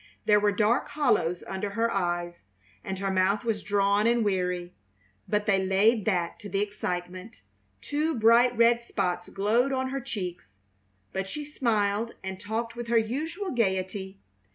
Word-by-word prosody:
There 210 Hz, -1 st, +5 dB
were 205 Hz, 0 st, +3 dB
dark 215 Hz, +5 st, +2 dB
hollows 235 Hz, -, +1 dB
under 190 Hz, +1 st, -3 dB
her 230 Hz, +3 st, 0 dB
eyes, 175 Hz, -2 st, -2 dB, 0.4 s
and 190 Hz, -, -4 dB
her 195 Hz, 0 st, -1 dB
mouth 190 Hz, +2 st, +2 dB
was 225 Hz, -3 st, -1 dB
drawn 200 Hz, +1 st, +2 dB
and 235 Hz, -1 st, +2 dB
weary, 180 Hz, -2 st, -1 dB, 0.5 s
but 210 Hz, 0 st, 0 dB
they 195 Hz, -2 st, +2 dB
laid 205 Hz, +3 st, +3 dB
that 180 Hz, -5 st, 0 dB
to 205 Hz, -, -8 dB
the 195 Hz, -, -1 dB
excitement. 185 Hz, 0 st, -4 dB, 0.4 s
Two 305 Hz, +2 st, -1 dB
bright 235 Hz, +2 st, +5 dB
red 235 Hz, 0 st, +5 dB
spots 180 Hz, -6 st, -2 dB
glowed 225 Hz, +7 st, +1 dB
on 260 Hz, -1 st, -1 dB
her 270 Hz, +1 st, -3 dB
cheeks; 180 Hz, -, -6 dB, 0.6 s
but 190 Hz, 0 st, -2 dB
she 295 Hz, +9 st, -5 dB
smiled 225 Hz, -5 st, 0 dB
and 190 Hz, 0 st, -5 dB
talked 230 Hz, +2 st, -3 dB
with 240 Hz, 0 st, -6 dB
her 235 Hz, 0 st, +3 dB
usual 315 Hz, -, -2 dB
gaiety. 190 Hz, -3 st, -1 dB
205 Hz, 155 wpm, -27 LUFS, 190-235 Hz, 0.6 s, There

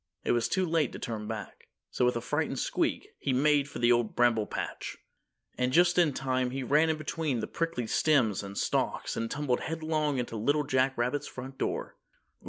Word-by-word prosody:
It -, -, +1 dB
was 120 Hz, -1 st, +2 dB
too 190 Hz, -1 st, +1 dB
late 160 Hz, -6 st, +1 dB
to -, -, -5 dB
turn 110 Hz, -2 st, -5 dB
back, 110 Hz, -4 st, -7 dB, 0.2 s
so 125 Hz, -, +1 dB
with 125 Hz, -, +2 dB
a 120 Hz, -, -1 dB
frightened -, -, -1 dB
squeak, -, -, -1 dB
he 135 Hz, -, 0 dB
made 145 Hz, +1 st, +3 dB
for -, -, -7 dB
the 120 Hz, 0 st, +3 dB
Old 120 Hz, -2 st, +2 dB
Bramble 115 Hz, -3 st, +3 dB
Patch. -, -, -5 dB, 0.6 s
And 125 Hz, 0 st, +1 dB
just 175 Hz, +4 st, +4 dB
in 165 Hz, -4 st, +4 dB
time 130 Hz, -1 st, -1 dB
he 135 Hz, +1 st, -3 dB
ran 150 Hz, +5 st, +3 dB
in 160 Hz, -, +1 dB
between 155 Hz, -4 st, -2 dB
the -, -, -2 dB
prickly 165 Hz, -8 st, -2 dB
stems 120 Hz, -5 st, +2 dB
and 100 Hz, 0 st, -8 dB
stalks -, -, -1 dB
and 115 Hz, 0 st, -2 dB
tumbled 135 Hz, -3 st, 0 dB
headlong 155 Hz, -3 st, -1 dB
into 120 Hz, -2 st, -3 dB
Little 145 Hz, +7 st, +2 dB
Jack 130 Hz, -1 st, +1 dB
Rabbit's 125 Hz, +4 st, -1 dB
front 130 Hz, +1 st, -8 dB
door. -, -, -3 dB
130 Hz, 195 wpm, -29 LUFS, 120-150 Hz, 0.6 s, just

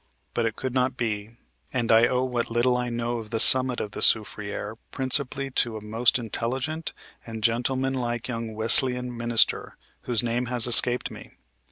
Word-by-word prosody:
But 115 Hz, -1 st, -1 dB
it 110 Hz, -, -5 dB
could 130 Hz, -2 st, -6 dB
not 130 Hz, 0 st, -1 dB
be, 105 Hz, -3 st, -4 dB, 0.4 s
and 120 Hz, -3 st, -2 dB
I 115 Hz, +1 st, +4 dB
owe 125 Hz, 0 st, -1 dB
what 125 Hz, -2 st, -3 dB
little 120 Hz, +2 st, 0 dB
I 125 Hz, 0 st, -3 dB
know 120 Hz, 0 st, -4 dB
of 110 Hz, -2 st, -11 dB
the 115 Hz, -, -3 dB
summit 130 Hz, +1 st, +7 dB
of 105 Hz, -, -6 dB
the -, -, -8 dB
soufriere 105 Hz, 0 st, 0 dB
principally 135 Hz, +1 st, -1 dB
to 115 Hz, -3 st, -2 dB
a 105 Hz, -, -11 dB
most 115 Hz, +4 st, 0 dB
intelligent 130 Hz, +7 st, -5 dB, 0.3 s
and 110 Hz, -2 st, -9 dB
gentleman 130 Hz, +4 st, -1 dB
like 120 Hz, -2 st, -4 dB
young 115 Hz, -3 st, -6 dB
Wesleyan 125 Hz, +2 st, +2 dB
minister, 115 Hz, -1 st, -1 dB, 0.3 s
whose 120 Hz, -1 st, 0 dB
name 120 Hz, +1 st, -3 dB
has 120 Hz, -2 st, +5 dB
escaped 120 Hz, +1 st, +5 dB
me. -, -, -13 dB
120 Hz, 175 wpm, -24 LUFS, 115-125 Hz, 0.4 s, summit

